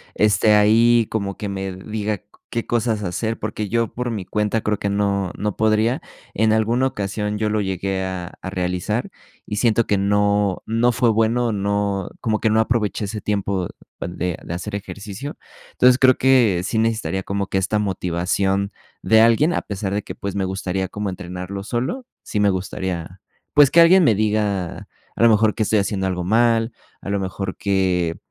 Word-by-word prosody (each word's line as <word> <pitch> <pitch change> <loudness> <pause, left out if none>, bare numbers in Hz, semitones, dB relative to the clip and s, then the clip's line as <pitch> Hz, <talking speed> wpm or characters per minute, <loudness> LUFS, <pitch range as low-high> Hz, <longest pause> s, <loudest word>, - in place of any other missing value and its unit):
esté 105 0 +4
ahí, 115 +2 +5
como 100 -3 -2
que 105 -2 -4
me 95 -1 -4
diga 105 +2 -4 0.3
qué 115 - -3
cosas 115 -3 0
hacer, 110 +5 -2
porque, 105 -1 -4
yo 115 +1 -1
por 125 0 -3
mi 105 -5 -3
cuenta 105 +3 -1
creo 105 -1 -1
que 100 - -2
no 100 -2 0
no 105 -1 -2
podría. 110 +3 +2 0.3
En 110 +1 +2
alguna 115 +4 +2
ocasión 105 -1 -3
yo 110 0 0
lo 110 0 0
llegué 95 0 -2
a 90 -2 -5
a - - -5
realizar 90 +5 -2 0.4
y 105 - -4
siento 115 0 +2
que 105 - +1
no 100 -1 +1
no 115 +2 +2
fue 120 -1 +2
bueno, 115 +2 +2
no, 100 -1 -1
como 110 -2 0
que 110 - +1
no 110 +1 +4
aproveché 110 -2 0
ese 105 +1 -4
tiempo 100 -3 -1 0.3
de 90 0 -3
de - - -6
hacer 100 +4 -5
ejercicio. 100 +6 -7 0.4
Entonces, 125 0 +5
creo 130 -1 +5
que 120 -9 +4
sí 110 - -2
necesitaría 110 -4 0
como 100 0 -2
que 95 - -1
esta 100 +3 0
motivación 95 +1 -1 0.3
de 110 0 +4
alguien, 115 +9 +4
a - - 0
pesar 100 -1 -4
de 105 - -1
que, - - -8
pues, 100 0 -5
me 95 -1 0
gustaría 95 0 -2
como 105 +1 -4
entrenarlo 90 +1 -6
solo, 130 - -3 0.2
sí 105 - -3
me 105 - +4
gustaría, 90 -2 -4 0.3
pues, 145 -2 +6
que 170 - +7
alguien 180 +1 +6
me 110 -6 +4
diga, 105 -4 -1 0.3
a - - -2
lo 115 - +8
mejor 110 -1 +4
que 110 - 0
estoy 105 +1 +2
haciendo 95 -1 -1
algo 90 -1 -2
mal, 115 +3 +2 0.3
a - - -7
lo 100 0 0
mejor 95 0 -4
que 95 -4 0
105 Hz, 185 wpm, -21 LUFS, 95-110 Hz, 0.4 s, lo